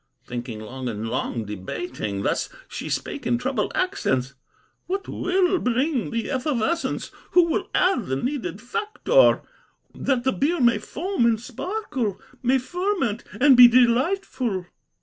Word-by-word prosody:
Thinking 120 Hz, -2 st, -5 dB
long 125 Hz, +3 st, -5 dB
and 110 Hz, 0 st, -4 dB
long 120 Hz, -2 st, -2 dB
debating, 105 Hz, +1 st, -4 dB
Thus -, -, 0 dB, 0.2 s
she -, -, -6 dB
spake 285 Hz, -, -3 dB
in 240 Hz, -, +2 dB
troubled 255 Hz, +2 st, -1 dB
accents: 140 Hz, -, 0 dB, 0.5 s
'What 390 Hz, +2 st, -3 dB
will 370 Hz, 0 st, +1 dB
bring 250 Hz, +2 st, 0 dB
the 230 Hz, +2 st, -3 dB
effervescence, 285 Hz, +4 st, -1 dB, 0.2 s
Who 355 Hz, -, +7 dB
will 350 Hz, +4 st, -1 dB
add 365 Hz, -, +2 dB
the 130 Hz, -, -1 dB
needed 250 Hz, -, -3 dB
factor, 430 Hz, -, +3 dB, 0.5 s
That 260 Hz, -3 st, 0 dB
the 265 Hz, 0 st, +2 dB
beer 315 Hz, +5 st, +1 dB
may 235 Hz, -4 st, +4 dB
foam 340 Hz, -, -1 dB
and 225 Hz, -2 st, +2 dB
sparkle, 260 Hz, -, -3 dB, 0.2 s
May 255 Hz, +2 st, +3 dB
ferment 305 Hz, -, -1 dB, 0.2 s
and 275 Hz, 0 st, +7 dB
be 245 Hz, 0 st, +11 dB
delightful? 245 Hz, -, +2 dB
250 Hz, 135 wpm, -24 LUFS, -, 0.5 s, be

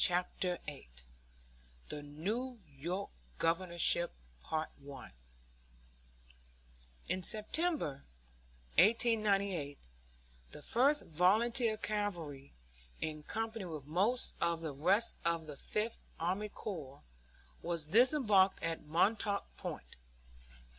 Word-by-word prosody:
CHAPTER 180 Hz, 0 st, +1 dB
VIII 145 Hz, -, -8 dB, 1.0 s
THE 150 Hz, -, -5 dB
NEW 210 Hz, -, -3 dB
YORK 165 Hz, +7 st, -4 dB, 0.3 s
GOVERNORSHIP 170 Hz, 0 st, +3 dB, 3.0 s
In 185 Hz, -, -1 dB
September, 215 Hz, -, 0 dB, 0.8 s
1898, 200 Hz, -, +3 dB, 0.7 s
the 150 Hz, -, -10 dB
First 280 Hz, +5 st, +3 dB
Volunteer 215 Hz, -, +3 dB
Cavalry, 175 Hz, -11 st, -3 dB, 0.5 s
in 155 Hz, -1 st, -3 dB
company 225 Hz, +4 st, -3 dB
with 155 Hz, -5 st, -6 dB
most 195 Hz, -, +1 dB
of 170 Hz, -1 st, +1 dB
the 155 Hz, -3 st, -3 dB
rest 185 Hz, +11 st, +3 dB
of 170 Hz, -1 st, +1 dB
the 150 Hz, -2 st, -7 dB
Fifth 215 Hz, +10 st, -2 dB, 0.2 s
Army 190 Hz, +5 st, -1 dB
Corps, 155 Hz, -11 st, -7 dB, 0.6 s
was 170 Hz, -2 st, -1 dB
disembarked 215 Hz, -, +4 dB
at 165 Hz, 0 st, -1 dB
Montauk 200 Hz, +5 st, +1 dB
Point. -, -, -7 dB
185 Hz, 85 wpm, -35 LUFS, 160-215 Hz, 3.0 s, disembarked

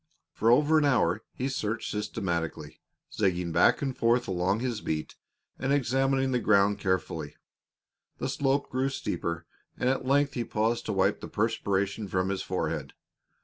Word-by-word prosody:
For 115 Hz, -, +1 dB
over 150 Hz, +6 st, +5 dB
an 150 Hz, -, +2 dB
hour 110 Hz, -8 st, +2 dB
he 130 Hz, -, -2 dB
searched 115 Hz, -4 st, -2 dB
systematically, 95 Hz, -6 st, -3 dB, 0.3 s
zigzagging 90 Hz, -4 st, 0 dB
back 80 Hz, -, +4 dB
and 135 Hz, -2 st, -2 dB
forth 120 Hz, +1 st, +2 dB
along 95 Hz, +3 st, 0 dB
his 120 Hz, -4 st, -2 dB
beat 80 Hz, -1 st, -3 dB, 0.4 s
and 135 Hz, +1 st, -1 dB
examining 135 Hz, 0 st, +2 dB
the 125 Hz, -, +2 dB
ground 100 Hz, -2 st, +3 dB
carefully. 95 Hz, -2 st, -2 dB, 0.8 s
The -, -, -2 dB
slope 140 Hz, 0 st, 0 dB
grew 130 Hz, +1 st, +1 dB
steeper, 85 Hz, -10 st, -3 dB, 0.3 s
and 125 Hz, -, 0 dB
at 135 Hz, 0 st, 0 dB
length 140 Hz, +2 st, +2 dB
he 120 Hz, -, -1 dB
paused 115 Hz, +1 st, -1 dB
to 105 Hz, -, -1 dB
wipe 95 Hz, +1 st, +2 dB
the -, -, -6 dB
perspiration 100 Hz, -2 st, -1 dB
from 95 Hz, 0 st, 0 dB
his 95 Hz, -1 st, -2 dB
forehead. -, -, -3 dB
110 Hz, 155 wpm, -28 LUFS, 95-130 Hz, 0.8 s, over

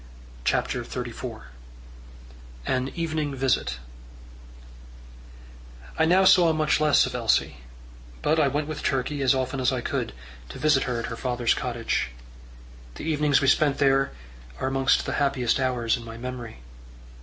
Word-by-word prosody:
CHAPTER -, -, 0 dB
XXXIV -, -, -6 dB, 1.2 s
An 130 Hz, 0 st, 0 dB
Evening 155 Hz, -4 st, -2 dB
Visit 130 Hz, -, 0 dB, 2.2 s
I 160 Hz, -, +5 dB
now 185 Hz, +3 st, +4 dB
saw 175 Hz, -3 st, +6 dB
much 155 Hz, -1 st, +1 dB
less 150 Hz, -2 st, +5 dB
of -, -, -5 dB
Elsie; -, -, +1 dB, 0.7 s
but 155 Hz, +2 st, +2 dB
I 150 Hz, -, +4 dB
went 145 Hz, +2 st, -1 dB
with 155 Hz, -1 st, -5 dB
Turkey, 140 Hz, +1 st, -1 dB
as 135 Hz, 0 st, +3 dB
often 130 Hz, 0 st, -2 dB
as 130 Hz, 0 st, +2 dB
I 130 Hz, -2 st, -2 dB
could, -, -, -3 dB, 0.4 s
to -, -, -8 dB
visit 155 Hz, -3 st, +2 dB
her 125 Hz, -2 st, -2 dB
at 115 Hz, -, -3 dB
her 115 Hz, -, -5 dB
father's 120 Hz, -1 st, 0 dB
cottage. 120 Hz, -, -2 dB, 0.9 s
The -, -, -8 dB
evenings 150 Hz, -2 st, +2 dB
we 135 Hz, -, +1 dB
spent 140 Hz, +1 st, +3 dB
there 135 Hz, -1 st, +3 dB, 0.5 s
are -, -, -1 dB
amongst 135 Hz, 0 st, +2 dB
the -, -, -2 dB
happiest 135 Hz, -3 st, +1 dB
hours 125 Hz, -3 st, +1 dB
in 120 Hz, -, -9 dB
my 115 Hz, 0 st, -9 dB
memory. 120 Hz, -, -7 dB
135 Hz, 145 wpm, -25 LUFS, 125-150 Hz, 2.2 s, saw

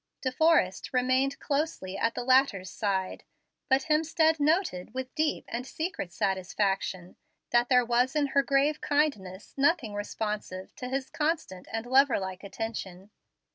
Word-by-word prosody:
De 260 Hz, -, -1 dB
Forrest 300 Hz, -, +2 dB
remained 260 Hz, +2 st, +2 dB
closely 280 Hz, -10 st, -2 dB
at 230 Hz, +3 st, 0 dB
the 245 Hz, -, -3 dB
latter's 250 Hz, -8 st, +3 dB
side, 190 Hz, -3 st, -2 dB, 0.5 s
but 265 Hz, 0 st, +3 dB
Hemstead 320 Hz, +1 st, +2 dB
noted 295 Hz, -, 0 dB
with 260 Hz, 0 st, -5 dB
deep 310 Hz, -1 st, 0 dB
and 245 Hz, +2 st, -5 dB
secret 315 Hz, -, -4 dB
satisfaction 190 Hz, -1 st, -1 dB, 0.3 s
that 240 Hz, 0 st, +3 dB
there 250 Hz, -2 st, +5 dB
was 245 Hz, +3 st, +1 dB
in 295 Hz, -1 st, +3 dB
her 280 Hz, -, +5 dB
grave 280 Hz, +2 st, +1 dB
kindness 220 Hz, -11 st, -1 dB
nothing 275 Hz, -6 st, +2 dB
responsive 205 Hz, -2 st, -4 dB
to 250 Hz, -, -5 dB
his 265 Hz, 0 st, -3 dB
constant 295 Hz, -, -2 dB
and 225 Hz, +1 st, -3 dB
lover 265 Hz, +1 st, +4 dB
like 190 Hz, -1 st, -5 dB
attention. 200 Hz, -2 st, -6 dB
250 Hz, 140 wpm, -28 LUFS, 195-285 Hz, 0.5 s, there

